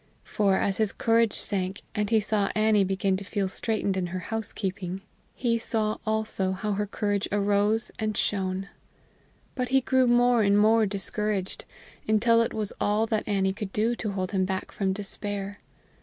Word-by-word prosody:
For, 195 -2 +1
as 195 -1 0
his 215 -2 +2
courage 230 -1 +2
sank, 190 0 -3
and 210 -1 -1
he 225 -1 +4
saw 210 -1 0
Annie 215 -1 +4
began 190 0 0
to 200 - -7
feel 200 0 -2
straitened 205 0 -1
in 185 -2 -1
her 180 +2 -4 0.2
housekeeping, 195 -4 -3 0.3
he 230 -2 0
saw 215 -2 -1
also 215 -3 0
how 210 +3 -3
her 205 +1 -1
courage 205 -1 -1
arose 205 +2 +1
and 215 -1 -2
shone. 190 -1 -1 0.8
But 250 -2 -2
he 265 +1 +4
grew 260 0 +2
more 245 0 +4
and 200 -1 +3
more 220 +1 +4
discouraged, 200 0 0 0.4
until 230 +2 +4
it 230 - 0
was 215 -2 -3
all 210 +2 +2
that 220 -1 -2
Annie 195 -2 +1
could 200 -1 -6
do 225 +4 +1
to 210 -3 -3
hold 185 -1 -3
him 190 -2 +1
back 190 0 -3
from 195 -2 -1
despair. 205 0 -4
205 Hz, 170 wpm, -26 LUFS, 195-220 Hz, 0.8 s, he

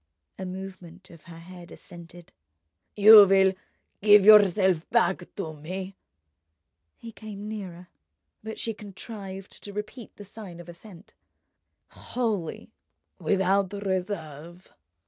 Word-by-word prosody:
A 190 - -5
movement 185 -1 -10
of 165 -2 -17
her 170 -1 -12
head 175 +1 -13
assented. 170 -1 -13 0.6
"You 210 0 +9
will 190 0 +4 0.5
give 205 -1 +6
yourself 190 -5 +5
back 175 0 0
to 160 -6 -5
me?" 185 +5 -7 1.0
He 230 - -11
came 210 -2 -10
nearer, 185 -5 -8 0.6
but 220 0 -7
she 225 - -3
contrived 195 -1 -10
to 205 - -9
repeat 210 +3 -8
the 205 - -12
sign 195 -4 -11
of 175 - -12
assent. 175 +2 -14 0.8
"Wholly, 215 -9 -4 0.5
without 195 0 0
reserve?" 180 -4 -6
190 Hz, 110 wpm, -26 LUFS, 175-205 Hz, 1.0 s, You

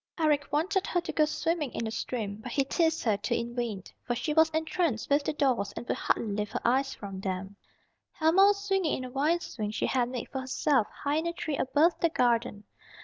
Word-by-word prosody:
Eric 295 -3 +2
wanted 370 +6 +1
her 355 - +1
to - - -4
go 305 - +3
swimming 315 -1 -1
in 230 - -2
the 220 - -3
stream, 220 -3 -3
but 240 +3 -8
he 275 - +3
teased 325 +3 +1
her 215 -4 +2
to 205 +1 -1
in 235 +1 -4
vain, 230 -6 -3 0.2
for 240 - -1
she 300 +5 -2
was 320 +1 +5
entranced 315 -6 -1
with 285 +1 +4
the - - 0
dolls 255 -9 +1
and 240 - -7
would - - 0
hardly - - 0
lift 210 +1 -3
her - - -2
eyes 265 +3 +2
from 195 -2 -7
them. 190 +1 -4 0.6
Helma 335 +5 +5
was 400 0 +2
swinging 385 -5 +1
in 255 - -5
a 250 - -8
vine 305 +6 +1
swing 215 -8 -4
she 215 - -1
had 245 -2 +1
made 250 -2 -5
for 265 - -3
herself 260 -2 +1
high 290 +1 -2
in 320 +2 -1
a 340 - -2
tree 310 -3 -3
above 300 +6 +2
the 335 - +3
garden. 235 -6 +1
270 Hz, 230 wpm, -29 LUFS, 230-320 Hz, 0.6 s, was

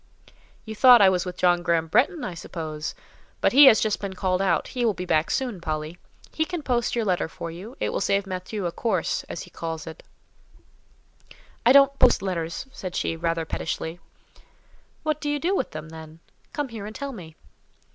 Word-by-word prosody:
"You 220 - -6
thought 245 +2 +8
I 195 -2 +7
was 185 -1 0
with 180 - -6
John 175 -1 +3
Graham 170 -2 +1
Bretton, 255 - +2
I 185 - -4
suppose? 155 -2 -6 0.4
But - - +2
he 285 +2 +9
has 225 -5 +8
just 215 -2 0
been 195 -2 -5
called 185 0 0
out: 190 -3 +1
he 250 -2 -3
will 220 -4 +2
be 180 - -5
back 160 -2 +1
soon, 245 -9 -2
Polly. 155 +1 -4 0.3
He 315 - +1
can 345 -1 -5
post 240 -3 0
your 230 -2 0
letter 180 -4 0
for 165 0 -7
you; 200 +10 -10
it - - -1
will - - -2
save 200 0 +1
Matthieu 185 +2 -5
a 170 - -1
'course,' 230 +6 -1
as - - -6
he - - -15
calls 165 -1 -5
it." 160 -1 -9 1.7
"I - - +8
don't 275 0 +6
post 250 -5 +4
letters," 170 +1 -3
said 185 -8 -7
she, - - -1
rather 165 0 -1
pettishly. 160 +1 -4 1.0
"What 310 -1 -1
do 295 - -2
you 290 - 0
do 350 +7 0
with 265 - -1
them, 155 0 -8
then?—come 160 - -9
here 215 -3 -7
and 215 - -9
tell 280 -1 -5
me." 170 -10 -11
190 Hz, 195 wpm, -25 LUFS, 165-245 Hz, 1.7 s, he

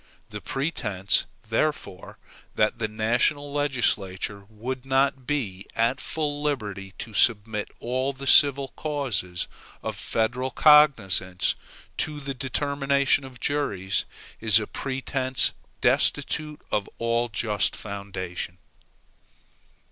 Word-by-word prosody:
The - - -6
pretense, 105 - -1 0.2
therefore, 115 -5 -2 0.4
that 110 +2 +2
the 110 - 0
national 120 +7 +1
legislature 100 -8 -1
would 125 +4 -5
not 135 -1 +1
be 105 -10 -2
at 120 +4 +2
full 145 -2 -2
liberty 105 -10 -3
to 115 - -7
submit 105 -1 +2
all 130 +3 -1
the 140 0 -9
civil 140 -1 +6
causes 125 - -2 0.4
of - - -3
federal 125 +4 -1
cognizance 110 - +4 0.4
to 150 -1 -1
the 140 -1 -4
determination 140 +1 +1
of 130 -2 -10
juries, 105 -10 0 0.3
is 110 -1 +5
a 105 - -3
pretense 130 0 0 0.3
destitute 150 -2 +1
of 105 -2 0
all 115 +1 0
just 105 -1 0
foundation. 95 -3 -5
125 Hz, 105 wpm, -26 LUFS, 105-140 Hz, 0.4 s, civil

